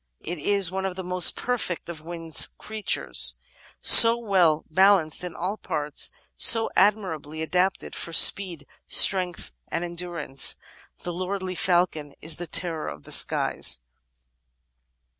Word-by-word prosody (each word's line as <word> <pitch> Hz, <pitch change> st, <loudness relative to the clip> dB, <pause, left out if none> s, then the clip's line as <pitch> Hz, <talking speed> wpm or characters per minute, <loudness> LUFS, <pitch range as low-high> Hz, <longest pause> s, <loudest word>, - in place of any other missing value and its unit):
It 175 Hz, 0 st, -7 dB
is 195 Hz, +2 st, 0 dB
one 190 Hz, 0 st, -4 dB
of 185 Hz, -, -8 dB
the 190 Hz, -, -8 dB
most 180 Hz, -1 st, +4 dB
perfect 245 Hz, -8 st, -5 dB
of 160 Hz, -3 st, -10 dB
winged 165 Hz, -1 st, 0 dB
Crea 220 Hz, 0 st, -8 dB
tures, -, -, 0 dB, 0.5 s
"so 230 Hz, 0 st, +9 dB
well 185 Hz, -9 st, 0 dB
balanced 185 Hz, -2 st, +1 dB
in 180 Hz, -2 st, -8 dB
all 190 Hz, +5 st, -5 dB
parts, 150 Hz, -6 st, -3 dB, 0.3 s
so 225 Hz, -1 st, +4 dB
admirably 165 Hz, -7 st, -2 dB
adapted 185 Hz, +3 st, -3 dB
for 170 Hz, -, -6 dB
speed, 170 Hz, -2 st, +4 dB, 0.2 s
strength, 180 Hz, -2 st, +3 dB, 0.2 s
and 170 Hz, -, -5 dB
endurance." 170 Hz, -5 st, -2 dB, 0.5 s
The 175 Hz, -, -6 dB
lordly 185 Hz, +1 st, -6 dB
falcon 175 Hz, -5 st, -2 dB
is 160 Hz, +1 st, -5 dB
"the 175 Hz, -, -8 dB
terror 165 Hz, -1 st, -3 dB
of 75 Hz, -, -10 dB
the -, -, -15 dB
skies." -, -, +1 dB
180 Hz, 135 wpm, -23 LUFS, 160-190 Hz, 0.5 s, so